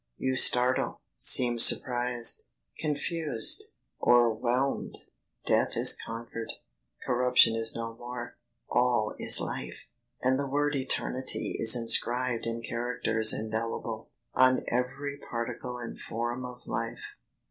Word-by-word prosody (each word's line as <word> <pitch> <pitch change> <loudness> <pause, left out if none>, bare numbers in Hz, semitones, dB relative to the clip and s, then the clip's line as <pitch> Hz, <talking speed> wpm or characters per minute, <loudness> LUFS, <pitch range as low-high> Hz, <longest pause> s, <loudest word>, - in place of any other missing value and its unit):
You 130 - -2
startle, 125 0 +4
seem 120 -2 +3
surprised! 120 0 +4 0.3
confused! 150 -4 0 0.4
o'erwhelmed! 120 +3 0 0.5
Death - - 0
is - - +6
conquered, 115 0 -7 0.5
corruption 125 -2 +3
is 115 0 -2
no 115 0 -6
more, 120 0 -9 0.3
All 120 -3 0
is - - +5
life, - - -7 0.4
and 130 +1 +1
the 140 -1 -4
word 145 +1 -1
ETERNITY 130 -3 -1
Is 115 +1 +8
inscribed 120 0 0
in 115 0 -5
characters 115 -2 +1
indelible, 110 0 -5 0.2
On 130 0 +2
every 140 +4 -4
particle 120 +1 -6
and 120 -1 -9
form 120 +2 -5
of 125 0 -12
life. - - -5
120 Hz, 110 wpm, -27 LUFS, 115-130 Hz, 0.5 s, Is